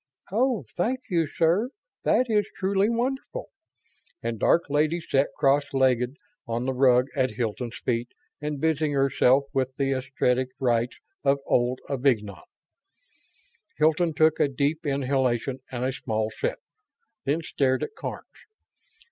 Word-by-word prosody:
"Oh, 230 - +1
thank 245 +8 0
you, 165 -3 +2
sir; 170 - +2 0.4
that 255 - +4
is 210 -3 +2
truly 195 +2 +2
wonderful!" 265 - -2 0.7
And 115 -2 -3
Dark 170 - +4
Lady 150 +4 +1
sat 140 -4 +1
cross 140 +1 +4
legged 130 -1 +2 0.3
on 115 +2 -2
the 130 - 0
rug 125 -1 +4
at 130 -2 +2
Hilton's 120 +1 -3
feet 120 -1 -1 0.3
and 150 -1 -3
busied 155 -1 +1
herself 135 -1 +3
with 130 -1 -1
the 135 0 +1
esoteric 130 -1 0
rites 120 -2 +1 0.3
of 140 0 +3
Old 125 +1 +1
Avignon. 125 -7 0 1.4
Hilton 160 +1 +2
took 155 +1 +4
a - - +4
deep 145 +4 -1
inhalation 130 -2 0
and 125 0 -2
a 130 - 0
small 110 -4 -2
sip, - - -2 0.7
then 150 +4 0
stared 130 -4 +1
at - - -5
Karns. - - -6
140 Hz, 135 wpm, -26 LUFS, 125-160 Hz, 1.4 s, that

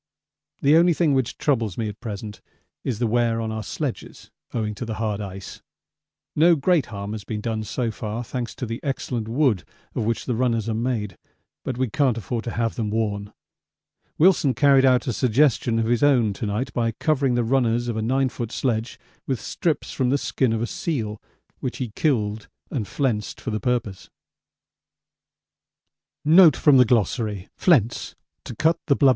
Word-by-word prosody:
The 145 +3 +6
only 170 +1 +5
thing 155 -4 +2
which 130 -3 0
troubles 115 - 0
me 115 - -1
at 105 0 -7
present 105 -2 -7 0.4
is 125 -5 -2
the 120 - 0
wear 115 0 +1
on 110 -1 -2
our 110 0 -3
sledges - - -5 0.2
owing 110 -3 -2
to 105 - -6
the 110 -2 -4
hard 110 -2 -2
ice. 95 -1 -8 0.7
No 170 +3 +5
great 160 0 +2
harm 100 -1 -6
has 110 -2 -5
been 105 +1 -4
done 110 0 -2
so 115 +2 -2
far, 110 +2 -4
thanks 120 0 -5
to - - -4
the 115 0 -5
excellent 125 -5 -3
wood 120 - +1 0.3
of - - -1
which 115 +1 -1
the 125 - -1
runners 115 -2 0
are 115 - 0
made, 110 -4 -2 0.5
but 125 - -3
we 130 0 +1
can't 130 0 +1
afford 115 +2 -4
to - - -2
have 115 -1 0
them 110 -5 -2
worn. 105 -2 -2 0.9
Wilson 155 -6 +4
carried 140 -2 +5
out 125 -1 +4
a 125 - -1
suggestion 120 0 +2
of 115 - +1
his 120 0 +1
own 125 -8 +4
to 105 - -4
night 105 +6 -2
by 115 -1 0
covering 135 -2 +1
the 120 - +2
runners 120 -1 +1
of 120 - -2
a 110 - -1
9 130 +4 +1
ft. 120 -2 -5
sledge 120 -3 -2 0.3
with 130 -4 -1
strips 165 -3 -2
from 130 -2 0
the 140 - +3
skin 130 -3 0
of 110 0 0
a - - +1
seal 110 -7 -3 0.4
which 125 - -4
he 125 -4 -4
killed 110 -8 0 0.2
and 115 -8 -2
flensed 120 -7 -2
for 120 - -4
the 110 - -1
purpose. 120 -6 -2
115 Hz, 165 wpm, -23 LUFS, 110-130 Hz, 0.9 s, The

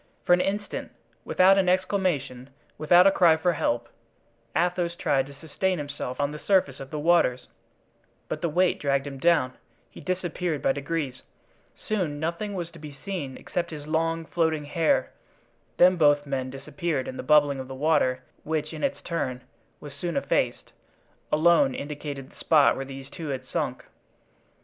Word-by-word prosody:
For - - +5
an 180 - +4
instant, 205 +2 -3 0.3
without 190 +1 +5
an 185 -2 +2
exclamation, 180 -9 0 0.3
without 175 +4 +5
a 195 - +7
cry 170 -4 +5
for 175 +2 +1
help, 120 -6 -1 0.7
Athos 175 0 0
tried 135 -5 +1
to 140 - -12
sustain 165 +6 -2
himself 145 -3 -5
on 145 0 0
the 150 - -7
surface 180 -9 +2
of 135 - -8
the 155 - -5
waters, 150 -6 +2 0.8
but 155 - -4
the 170 - 0
weight 180 +4 +2
dragged 140 -1 0
him 135 -1 -7
down; 155 -5 +3 0.4
he - - -12
disappeared 180 -3 -2
by - - +4
degrees; 140 -2 -3 0.5
soon 180 -9 -2
nothing 170 +6 -3
was 170 -2 -4
to 165 - -13
be 150 -2 -10
seen 165 -10 -4
except 170 -1 -3
his 150 -2 -8
long, 165 +1 0
floating 155 -1 0
hair; 160 +2 +1 0.7
then 180 +1 +6
both 145 -2 +4
men 135 -2 -2
disappeared 135 +2 -3
and 130 - -6
the - - -1
bubbling 145 0 +4
of 130 - -6
the 135 - -7
water, 130 -3 +1 0.2
which, 155 -1 -3
in - - -6
its 280 0 -1
turn, 130 -7 -3 0.4
was 145 -1 -10
soon 170 +3 -3
effaced, - - -1 0.6
alone 155 -4 +4
indicated 145 -2 -6
the - - -21
spot 150 -3 +4
where 135 - -4
these 135 0 -9
two 165 -3 -7
had 135 -2 -4
sunk. - - -3
155 Hz, 170 wpm, -26 LUFS, 140-175 Hz, 0.8 s, a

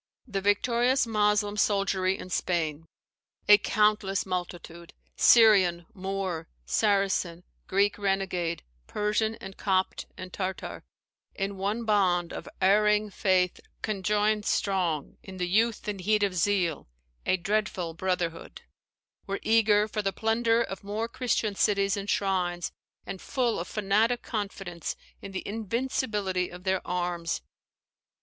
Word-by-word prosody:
The 200 -6 -3
victorious 240 +6 +2
Moslem 210 -1 +1
soldiery 195 -2 +1
in 185 - -9
Spain, 165 -4 -1 0.6
"A 210 0 +9
countless 210 -2 +1
multitude; 175 -2 -5 0.2
Syrian, 190 -7 +6
Moor, 190 -3 -3 0.2
Saracen, 180 - +1 0.2
Greek 200 +2 +2
renegade, 190 -4 -1 0.2
Persian, 215 +1 0
and 195 -3 -10
Copt, 190 -2 0
and 185 0 -8
Tartar, 190 -1 -4 0.5
in 195 0 -2
one 205 +5 -2
bond 185 -5 +2
Of - - -7
erring 210 +2 +3
faith 185 -2 +1 0.2
conjoined 210 +1 +1
strong 180 -7 0
in 190 -1 -10
the 180 -1 -1
youth 220 +5 +1
And 205 -2 -3
heat 210 +3 +2
of 200 -2 +1
zeal 180 -3 0 0.4
a 185 - +3
dreadful 190 -3 -1
brotherhood," 170 -1 -3 0.6
were 195 0 -2
eager 215 -2 +4
for 215 0 -2
the 195 -1 0
plunder 225 +2 +2
of 195 -4 -7
more 210 +3 -2
Christian 230 -3 -1
cities 200 0 +2
and 200 0 -5
shrines, 180 -4 0 0.3
and 190 - -6
full 245 -4 0
of - - -4
fanatic 215 +4 +1
confidence 195 -5 -4 0.3
in 195 - -8
the 190 - -5
invincibility 210 -4 -1
of 180 +1 -11
their 190 -1 +1
arms. 175 -1 -2
195 Hz, 125 wpm, -28 LUFS, 180-210 Hz, 0.6 s, A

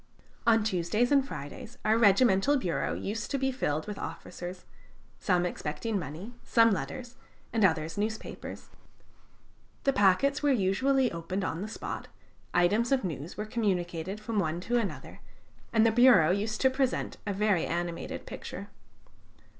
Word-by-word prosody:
On 225 -2 +5
Tuesdays 210 +5 +1
and 280 -1 +5
Fridays 180 - -8
our 215 - +4
regimental 225 +4 +4
bureau 180 -10 -1
used 215 +2 -4
to 280 - 0
be 265 0 0
filled 155 - -1
with 210 -1 -6
officers: 180 +1 -7 0.5
some 180 -2 +2
expecting 195 +6 -3
money, 170 - -7
some 230 -1 +4
letters, 245 +4 -4 0.4
and 225 -2 +2
others 160 0 +1
newspapers. 220 +1 -5 1.1
The 275 - +3
packets 265 +7 +3
were 295 - +2
usually 255 +4 +2
opened 170 +4 -3
on 170 -1 -2
the 210 - -3
spot, 215 - -6 0.4
items 205 +8 +2
of 270 -3 +2
news 160 -3 -5
were 210 - -3
communicated 190 -4 -2
from 215 0 -2
one 165 -2 -1
to 240 +5 +1
another, 215 -4 -5 0.5
and 225 -1 +4
the 225 - +5
bureau 220 -9 +6
used 210 +3 -1
to 265 - +4
present 260 -1 -1
a - - +1
very 200 -3 +1
animated 170 0 -3
picture. - - -7
210 Hz, 145 wpm, -29 LUFS, 180-240 Hz, 1.1 s, bureau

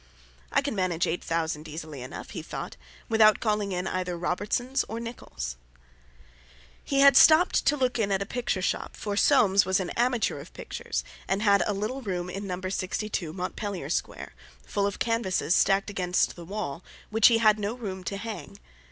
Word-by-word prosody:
"I 275 - +2
can 280 - -2
manage 185 -4 0
eight 170 - -2
thousand 160 -2 -2
easily 155 -3 -7
enough," 125 - -8
he - - -5
thought, - - -6 0.3
"without 215 -1 +5
calling 210 -2 0
in 180 0 -2
either 180 -2 -2
Robertson's 205 +9 -1
or 225 - -5
Nicholl's." 65 - -6 1.3
He 275 -1 +1
had 280 0 +8
stopped 320 +3 +6
to 295 +1 +4
look 255 -2 0
in 205 -2 +1
at 195 - +2
a 200 - -2
picture 225 -4 -2
shop, - - -2
for 205 -1 -3
Soames 200 -5 +5
was 190 +1 +1
an 185 - -3
"amateur" 245 -1 0
of - - -12
pictures, - - -4 0.2
and 195 +2 0
had 200 -2 +5
a 210 - 0
little 220 +7 -3
room 180 -5 -3
in 195 +2 -5
No. 180 -1 -3
62, 190 -2 -3
Montpellier 185 +2 -4
Square, - - -3 0.3
full 200 -1 0
of 200 - -4
canvases, 230 -7 0
stacked 195 +1 +3
against 180 -2 0
the 170 - -10
wall, 185 -4 -5 0.3
which 225 0 +6
he 230 - +5
had 215 -1 +4
no 210 +3 -2
room 190 -6 -6
to 200 - -3
hang. 220 +1 -7
200 Hz, 180 wpm, -27 LUFS, 180-225 Hz, 1.3 s, had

